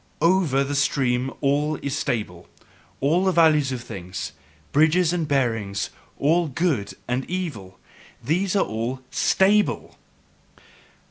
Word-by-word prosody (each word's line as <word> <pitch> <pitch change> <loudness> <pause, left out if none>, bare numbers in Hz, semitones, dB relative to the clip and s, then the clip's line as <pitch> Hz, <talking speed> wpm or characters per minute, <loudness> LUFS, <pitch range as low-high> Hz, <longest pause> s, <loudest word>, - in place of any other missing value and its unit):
"OVER 165 -6 +3
the 140 +1 -3
stream 135 -2 +1
all 145 +2 +1
is 140 0 -2
stable, 105 -10 -3 0.5
all 160 +7 +2
the 190 - +3
values 155 -5 +4
of 125 -2 -4
things, 90 -6 -6
the 75 +1 -31
bridges 160 +3 +3
and 170 -3 -1
bearings, 115 -8 -1 0.3
all 165 +4 +2
'good' 140 - -1
and 125 +2 -1
'evil': 135 - -5 0.5
these 180 - 0
are 195 - +3
all 115 +4 -3
STABLE!" 205 +2 +2
140 Hz, 125 wpm, -23 LUFS, 115-165 Hz, 0.5 s, values